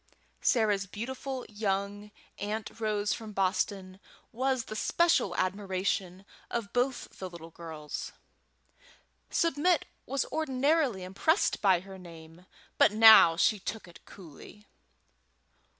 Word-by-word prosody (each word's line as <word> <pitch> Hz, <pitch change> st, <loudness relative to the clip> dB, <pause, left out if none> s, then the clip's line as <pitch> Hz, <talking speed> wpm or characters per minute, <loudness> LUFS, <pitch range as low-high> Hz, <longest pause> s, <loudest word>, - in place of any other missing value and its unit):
Sarah's 210 Hz, -5 st, +2 dB
beautiful 255 Hz, +5 st, -6 dB
young 205 Hz, 0 st, -3 dB, 0.3 s
Aunt 210 Hz, +2 st, -5 dB
Rose 210 Hz, -2 st, 0 dB
from 220 Hz, -2 st, -8 dB
Boston 190 Hz, 0 st, -1 dB, 0.3 s
was 260 Hz, +1 st, 0 dB
the 215 Hz, -, -7 dB
special 330 Hz, -, +2 dB
admiration 190 Hz, -1 st, -2 dB, 0.2 s
of 230 Hz, -4 st, -4 dB
both 250 Hz, +1 st, -2 dB
the 185 Hz, -, -5 dB
little 165 Hz, -1 st, -11 dB
girls. 160 Hz, -3 st, -7 dB, 1.2 s
Submit 335 Hz, +1 st, +1 dB, 0.2 s
was 275 Hz, 0 st, -1 dB
ordinarily 280 Hz, -, +1 dB
impressed 195 Hz, -, +1 dB
by 190 Hz, -4 st, +4 dB
her 190 Hz, 0 st, -11 dB
name, 165 Hz, 0 st, -14 dB, 0.3 s
but -, -, +6 dB
now 215 Hz, -6 st, +8 dB
she 200 Hz, +5 st, +3 dB
took 215 Hz, +1 st, -6 dB
it 170 Hz, -, -16 dB
coolly. 195 Hz, +4 st, -14 dB
205 Hz, 110 wpm, -29 LUFS, 185-240 Hz, 1.2 s, now